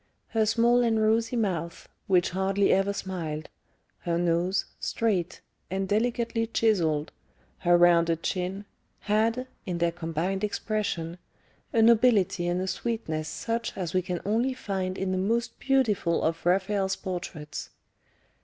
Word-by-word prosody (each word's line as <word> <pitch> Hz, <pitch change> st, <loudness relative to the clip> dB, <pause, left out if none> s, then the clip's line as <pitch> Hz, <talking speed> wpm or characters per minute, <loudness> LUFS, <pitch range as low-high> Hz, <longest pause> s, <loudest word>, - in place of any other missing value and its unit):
Her 220 Hz, -1 st, +1 dB
small 235 Hz, +2 st, +4 dB
and 230 Hz, -2 st, +2 dB
rosy 225 Hz, +2 st, +2 dB
mouth, 175 Hz, -7 st, -2 dB, 0.2 s
which 180 Hz, -2 st, +3 dB
hardly 195 Hz, +2 st, +2 dB
ever 195 Hz, +1 st, +2 dB
smiled, 165 Hz, -6 st, -4 dB, 0.5 s
her 170 Hz, -1 st, -1 dB
nose, 175 Hz, +2 st, +1 dB
straight, 195 Hz, -7 st, -1 dB, 0.3 s
and 190 Hz, +1 st, -2 dB
delicately 230 Hz, +2 st, 0 dB
chiselled, 170 Hz, -10 st, +1 dB, 0.5 s
her 175 Hz, 0 st, +4 dB
rounded 170 Hz, -1 st, +4 dB
chin, 190 Hz, +2 st, -2 dB, 0.4 s
had, 225 Hz, +4 st, +1 dB, 0.2 s
in 180 Hz, -2 st, -2 dB
their 170 Hz, 0 st, +1 dB
combined 170 Hz, +3 st, -2 dB
expression, 200 Hz, -5 st, -2 dB, 0.5 s
a 225 Hz, -, +3 dB
nobility 215 Hz, -6 st, +4 dB
and 175 Hz, +1 st, 0 dB
a 190 Hz, -, -2 dB
sweetness 185 Hz, -6 st, -3 dB
such 230 Hz, -2 st, -3 dB
as 180 Hz, -4 st, -3 dB
we 185 Hz, -, +3 dB
can 180 Hz, -1 st, -4 dB
only 235 Hz, +6 st, +1 dB
find 190 Hz, -5 st, -3 dB
in 190 Hz, -1 st, -1 dB
the 185 Hz, -, 0 dB
most 230 Hz, +5 st, -1 dB
beautiful 220 Hz, -11 st, +1 dB
of 165 Hz, +1 st, -1 dB
Raphael's 195 Hz, +1 st, +1 dB
portraits. 175 Hz, -6 st, -6 dB
190 Hz, 135 wpm, -27 LUFS, 175-220 Hz, 0.5 s, small